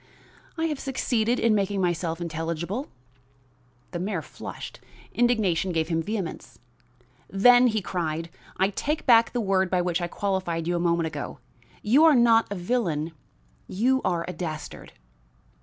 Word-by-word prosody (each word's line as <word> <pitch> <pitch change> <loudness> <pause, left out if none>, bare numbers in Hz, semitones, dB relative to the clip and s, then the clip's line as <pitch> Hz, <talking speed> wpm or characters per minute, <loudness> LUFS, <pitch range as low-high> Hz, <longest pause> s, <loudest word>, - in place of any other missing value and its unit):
"I 325 - 0
have 300 -4 -2
succeeded 245 -3 0
in 230 -1 +3
making 200 -1 0
myself 175 -2 -1
intelligible." 170 - -3 1.0
The 175 - -4
mayor 185 -3 -2
flushed; - - -9 0.3
indignation 215 -7 +1
gave 160 -1 -1
him 165 -1 +1
vehemence. 195 -1 -5 0.7
"Then," 245 +5 +6
he 215 -4 0
cried, 165 -2 -3 0.3
"I 190 +1 +2
take 300 +9 -2
back 230 -3 +6
the 245 - -2
word 190 -2 +1
by 180 -1 +1
which 175 0 -1
I 175 - -1
qualified 175 -3 -2
you 175 - 0
a - - 0
moment 170 -1 +1
ago. 150 -3 -5 0.5
You 255 +9 +5
are 315 -3 +7
not 230 -2 +5
a - - -2
villain, 175 -6 -1 0.6
you 255 +7 +1
are 170 -2 0
a 180 - -4
dastard." 160 -3 -6
190 Hz, 150 wpm, -26 LUFS, 170-230 Hz, 1.0 s, are